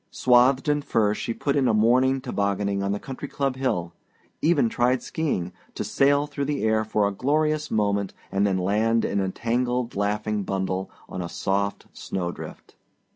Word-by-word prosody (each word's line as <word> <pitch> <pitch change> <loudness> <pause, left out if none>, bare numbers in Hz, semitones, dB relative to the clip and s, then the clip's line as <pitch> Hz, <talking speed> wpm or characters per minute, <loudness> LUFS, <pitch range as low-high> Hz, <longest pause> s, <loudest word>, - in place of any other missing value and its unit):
Swathed 130 +2 +4
in 145 0 +2
furs 105 -6 +1
she - - -2
put 140 +4 -1
in 135 -3 +3
a 110 - +3
morning 130 +4 +3
tobogganing 100 -5 -1
on 100 0 -1
the 100 - -1
country 135 +2 -7
club 135 -2 -1
hill; 90 -11 -1 0.5
even 155 -6 +3
tried 125 +3 +1
skiing, 90 - -2 0.2
to - - -2
sail 140 +1 +3
through 145 -1 -4
the 145 0 -2
air 110 0 +2
for 105 -1 +1
a - - -1
glorious 150 +6 0
moment 100 -2 0 0.2
and 100 +1 +2
then 95 -1 +1
land 110 +5 +1
in 100 - 0
a 95 -1 0
tangled 120 +3 -1
laughing 105 +1 -1
bundle 95 0 -2 0.2
on 90 - -5
a 85 - -4
soft 100 +2 -1
snow 90 -2 -3
drift. - - -10
110 Hz, 180 wpm, -25 LUFS, 100-135 Hz, 0.5 s, Swathed